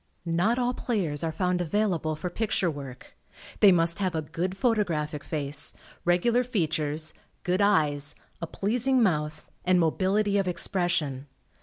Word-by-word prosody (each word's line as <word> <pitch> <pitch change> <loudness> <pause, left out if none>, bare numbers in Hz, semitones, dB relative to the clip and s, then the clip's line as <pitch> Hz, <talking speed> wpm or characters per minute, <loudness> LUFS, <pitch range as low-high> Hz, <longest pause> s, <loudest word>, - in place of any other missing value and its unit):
Not 175 +8 +1
all 250 0 +1
players 175 - -2
are 165 - 0
found 180 +2 0
available 175 -3 0
for 180 +3 -5
picture 195 -3 0
work. 135 -4 -10 0.4
They 205 - +8
must 170 0 +2
have 185 -3 -1
a 160 - -1
good 180 +5 -3
photographic 170 - 0
face, 145 -2 0 0.3
regular 230 +8 +3
features, 155 -8 -1 0.3
good 180 +2 +1
eyes, 150 -8 +2 0.3
a 170 - -3
pleasing 245 +8 +1
mouth 150 -6 -1 0.2
and 180 0 +3
mobility 200 +5 +2
of 195 - -1
expression. 175 -7 0
175 Hz, 140 wpm, -27 LUFS, 155-200 Hz, 0.4 s, They